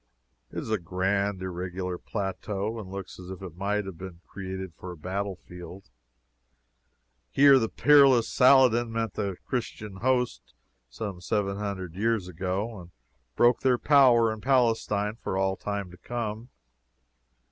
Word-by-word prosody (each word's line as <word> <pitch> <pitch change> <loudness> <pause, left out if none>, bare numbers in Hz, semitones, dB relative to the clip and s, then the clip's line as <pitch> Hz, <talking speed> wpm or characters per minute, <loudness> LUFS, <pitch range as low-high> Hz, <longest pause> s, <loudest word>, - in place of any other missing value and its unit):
It - - -9
is - - -4
a 110 - +1
grand, 95 +2 -1
irregular 90 0 -4
plateau, 105 +2 -3
and 100 -4 -8
looks 95 -1 -7
as 90 0 -10
if 95 0 -8
it 90 -4 -8
might 100 +2 -1
have 95 -4 -8
been 90 -3 -8
created 95 -2 -6
for 90 +3 -9
a 90 - -9
battle 95 +5 -3
field. 90 -2 -11 1.4
Here 140 -1 +6
the 110 -2 -1
peerless 135 -4 +5
Saladin 125 -3 +5
met 115 -1 -2
the 100 -2 -2
Christian 110 -5 -4
host 125 +2 -1 0.3
some 90 - -6
seven 100 +2 -1
hundred 95 -4 -4
years 110 0 0
ago, 95 +5 -3
and 85 - -13 0.5
broke 120 +1 +4
their 130 -2 +3
power 120 -5 +5
in 110 - -9
Palestine 115 -4 +1
for 95 - -2
all 95 0 +1
time 100 -3 -4
to 90 - -13
come. 115 0 -4
100 Hz, 145 wpm, -27 LUFS, 95-115 Hz, 1.4 s, Here